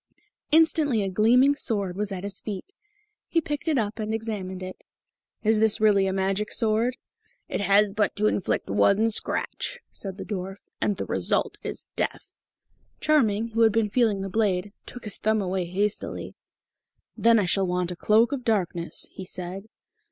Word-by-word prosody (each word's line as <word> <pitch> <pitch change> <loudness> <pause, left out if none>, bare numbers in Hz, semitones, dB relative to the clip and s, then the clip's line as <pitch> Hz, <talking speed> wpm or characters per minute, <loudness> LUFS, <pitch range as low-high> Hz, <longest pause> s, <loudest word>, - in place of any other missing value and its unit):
Instantly 305 -7 +3
a 195 - -1
gleaming 245 +8 +4
sword 200 -9 -1
was 205 +1 -2
at 185 -1 -5
his 200 0 -4
feet. 215 - -6 0.5
He 335 - +2
picked 295 0 -4
it 310 -3 +2
up 220 -1 -1
and 215 0 -1
examined 195 -4 -4
it. 185 0 -8 0.6
"Is 220 0 +3
this 220 -1 +3
really 205 -3 +4
a - - 0
magic 195 +2 -1
sword?" 230 +2 +2 0.5
"It - - -2
has 200 +1 +4
but 210 0 0
to 210 - 0
inflict 200 -3 0
one 195 - +3
scratch," - - -2
said 195 -2 -6
the - - -6
dwarf, 195 -1 -5 0.2
"and 205 - +1
the - - -3
result - - 0
is - - -4
death." - - -3 0.7
Charming, 230 -8 +2
who 230 +1 -1
had 225 -1 +6
been 215 -1 +1
feeling 220 -5 +2
the 195 - -3
blade, 205 -1 0
took 245 - -9
his 210 - -5
thumb 220 0 +2
away 185 -2 -1
hastily. 200 +4 -2 0.8
"Then 230 0 +4
I 205 - +2
shall 190 +1 +1
want 180 0 -1
a - - -4
cloak 220 +6 +3
of 275 -3 -3
darkness," 180 -7 -1
he 190 - -8
said. 185 +2 -6
210 Hz, 175 wpm, -26 LUFS, 190-225 Hz, 0.8 s, had